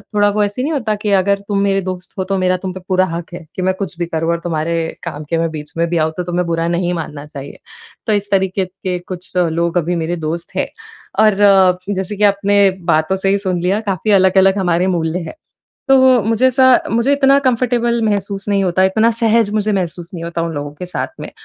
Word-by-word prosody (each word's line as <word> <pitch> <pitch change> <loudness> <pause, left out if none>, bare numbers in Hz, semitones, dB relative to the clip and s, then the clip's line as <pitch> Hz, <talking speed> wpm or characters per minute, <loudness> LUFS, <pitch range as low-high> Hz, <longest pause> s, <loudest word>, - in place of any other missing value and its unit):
थोड़ा 205 0 +4
वो 210 +1 +1
ऐसे 205 +5 -2
नहीं 315 +3 -1
होता 220 -6 -1
कि 210 - 0
अगर 200 +1 +1
तुम 200 -1 0
मेरे 195 -1 +1
दोस्त 185 0 -7
हो 190 - -1
तो 195 +1 -2
मेरा 185 0 +1
तुम 185 0 -5
पे 185 - -7
पूरा 185 0 +2
हक़ 170 +1 -7
है 165 - -10
कि 185 - -3
मैं 185 +1 +1
कुछ 180 -3 -4
भी 170 - 0
करूँ 165 0 -1
और 170 - -1
तुम्हारे 165 -1 -1 0.3
काम 155 -3 -6
के 165 - 0
मैं 165 0 0
बीच 150 -1 -7
में 170 0 +1
भी 170 - 0
आऊँ 160 0 +1
तो 180 - -2
तुम्हें 175 0 -1
बुरा 165 0 -1
नहीं 175 +1 0
मानना 150 -3 -6
चाहिए। 140 -2 -10 0.5
तो 215 - +2
इस 205 0 -1
तरीक़े 190 0 +1
के 180 0 -5
कुछ 180 0 -5
लोग 170 0 +1
अभी 175 +1 0
मेरे 170 +1 -2
दोस्त 170 +2 -5
हैं - - +1 0.6
और 210 -2 +3 0.6
जैसे 190 +2 -3
कि 210 - -2
आपने 200 0 +3 0.2
बातों 155 +4 +1
से 195 0 -1
ही 200 - +3
सुन 180 -2 0
लिया 190 +4 +1
काफ़ी 195 +3 -1
अलग-अलग 190 0 +4
हमारे 180 -1 +1
मूल्य 170 -1 -1
हैं। 170 - -7 0.5
तो 270 - +6 0.3
मुझे 225 +4 +2
ऐसा 260 +1 +3 0.3
मुझे 235 +5 +2
इतना 275 0 +4
कंफ़र्टेबल 240 -2 +1
महसूस 200 -1 -1
नहीं 200 -1 +2
होता, 185 +1 +2
इतना 220 +4 +3
सहज 225 -2 +2
मुझे 215 0 +1
महसूस 175 -2 -3
नहीं 165 -1 -6
होता 170 0 -3
उन 165 -1 -3
लोगों 145 0 -4
के 180 +4 -7
साथ 180 - -3
में। - - -7
185 Hz, 230 wpm, -17 LUFS, 170-205 Hz, 0.6 s, तो